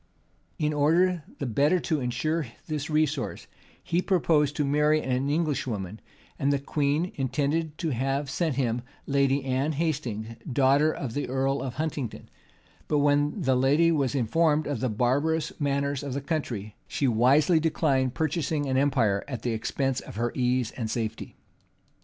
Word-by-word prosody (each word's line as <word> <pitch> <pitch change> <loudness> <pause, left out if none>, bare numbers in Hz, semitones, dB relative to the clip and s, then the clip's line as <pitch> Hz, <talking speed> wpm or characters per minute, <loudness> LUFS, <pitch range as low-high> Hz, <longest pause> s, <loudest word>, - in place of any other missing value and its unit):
In 150 0 0
order 165 +4 +2
the - - -3
better 145 +9 +2
to 155 -3 0
insure 145 +5 -1 0.2
this 150 -1 -3
resource, 150 -3 0 0.4
he 170 +2 0
purposed 160 -6 +2
to 150 - 0
marry 150 +2 +3
an 130 -1 -1
English 150 -3 0
woman; 105 -2 -4 0.4
and 140 +1 +2
the 140 - +2
queen 145 +5 0
intended 145 +4 -1
to 160 - -2
have 135 +3 -1
sent 155 +1 -1
him 120 -3 0 0.2
Lady 140 -1 +1
Anne 135 +4 0
Hastings; 125 -8 -2
daughter 140 +4 +4
of 125 -7 -5
the 145 -1 -3
earl 135 +1 0
of 130 -1 -4
Huntingdon: 145 -5 -4 0.6
but 150 - +1
when 145 +4 +2
the 130 -2 +3
lady 145 +6 +4
was 145 -4 0
informed 150 +5 +2
of 145 - -2
the 130 - 0
barbarous 140 +8 +1
manners 140 -1 0
of 140 -3 -4
the 140 - -2
country, 120 - -3
she 140 - 0
wisely 135 +8 +4
declined 140 -5 +1
purchasing 155 -1 -1
an 130 -1 0
empire 125 -8 +2
at 125 -5 -5
the 120 - 0
expense 130 +4 -1
of - - -10
her 120 +2 -1
ease 125 -2 0
and 115 -3 -4
safety. 110 -1 -4
140 Hz, 160 wpm, -27 LUFS, 130-155 Hz, 0.6 s, daughter